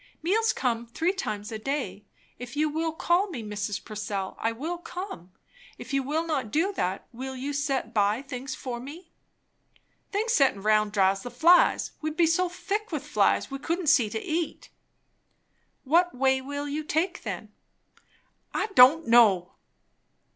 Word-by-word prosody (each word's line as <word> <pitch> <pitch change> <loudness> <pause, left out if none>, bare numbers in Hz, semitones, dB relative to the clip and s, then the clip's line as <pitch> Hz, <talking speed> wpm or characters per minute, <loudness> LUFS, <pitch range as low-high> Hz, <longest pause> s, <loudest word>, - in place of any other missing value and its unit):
"Meals 440 +6 +2
come 235 -2 -1
three 330 +10 0
times 215 - -4
a 220 - -5
day. 215 -6 -3 0.3
If 245 +2 -8
you 305 +1 +2
will 320 +2 -1
call 345 +5 +1
me, 260 -10 -6
Mrs. 205 -1 -4
Purcell, 205 -3 -4
I 225 - 0
will 320 +9 -4
come. 350 - -8 0.5
If - - -9
you 275 - +2
will 305 +5 -1
not 280 -9 -2
do 335 - +1
that, 185 - -2
will 260 +2 -6
you 275 +3 -4
set 280 -2 -1
by 210 +4 +2
things 265 -1 -6
for 245 -2 -5
me?" 310 +8 -10 1.0
"Things 440 +3 0
settin' 265 - +3
round 215 -1 +3
draws 195 -1 +2
the 245 - -6
flies. 330 +9 +4
We'd 310 0 -3
be 345 - +5
so 350 +3 +2
thick 415 +5 -3
with - - -3
flies, - - +1
we 275 - -4
couldn't 335 +2 -1
see 235 -6 +3
to 220 - -3
eat." 320 +6 -3 1.1
"What 340 +5 +3
way 265 +1 +2
will 285 +2 -5
you 300 +2 -3
take, 320 +5 -1
then?" - - -6 1.0
"I - - 0
don' 295 +5 +7
know!" 210 -7 +5
275 Hz, 160 wpm, -27 LUFS, 225-330 Hz, 1.1 s, don